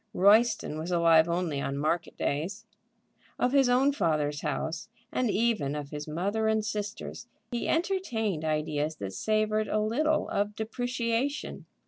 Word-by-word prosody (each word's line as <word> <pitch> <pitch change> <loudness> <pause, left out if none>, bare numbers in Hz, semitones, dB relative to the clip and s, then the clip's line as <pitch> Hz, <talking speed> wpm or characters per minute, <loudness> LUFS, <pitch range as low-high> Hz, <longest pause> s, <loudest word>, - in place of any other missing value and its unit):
Royston 215 -4 +4
was 160 +3 -4
alive 165 -2 +5
only 170 -5 -1
on 140 0 -2
market 160 +3 -1
days. 185 +10 -2 0.7
Of 250 - +1
his 270 -2 +4
own 260 +3 +4
father's 150 - 0
house, 160 +6 -3 0.2
and 250 -2 0
even 205 -11 +1
of 145 -1 -5
his 150 0 -5
mother 200 +8 -1
and 220 -1 +1
sisters, 210 0 -5 0.2
he 240 - -2
entertained 245 - 0
ideas 155 0 -1
that 100 -7 -6
savored 215 - +1
a 215 - 0
little 295 +9 +1
of 205 +1 -1
depreciation. 245 +4 -2
205 Hz, 140 wpm, -29 LUFS, 155-230 Hz, 0.7 s, alive